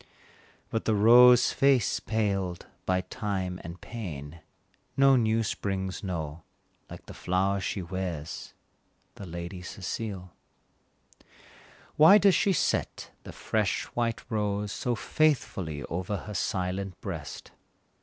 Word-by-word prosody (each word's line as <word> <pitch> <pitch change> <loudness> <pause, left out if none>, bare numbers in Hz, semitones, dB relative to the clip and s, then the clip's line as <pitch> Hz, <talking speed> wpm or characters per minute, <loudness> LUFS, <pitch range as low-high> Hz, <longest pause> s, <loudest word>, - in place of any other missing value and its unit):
But 115 - -2
the 110 - +2
rose 120 +3 +7
face 135 -3 +3
paled 100 -5 -2 0.2
by 95 0 +2
time 95 -2 -4
and 85 +1 -8
pain, 85 -9 -7 0.6
No 135 0 +6
new 115 -2 +2
springs 95 -2 -3
know, 80 -4 -4 0.5
like - - -10
the - - -10
flower 95 +2 0
she 95 0 -3
wears, 85 -4 -5 0.6
The 100 - -10
Lady 85 +2 -6
Cecile. 95 -1 -6 1.6
Why 160 +7 +9
does 200 -2 +5
she 200 - +3
set 180 - -1
the - - -7
fresh 110 -3 -1
white 115 -1 -1
rose 105 -3 -1
So 120 +3 -2
faithfully 100 - 0
over 90 +4 -3
her 105 - -8
silent 95 0 -2
breast? 80 -8 -7
100 Hz, 115 wpm, -28 LUFS, 90-115 Hz, 1.6 s, Why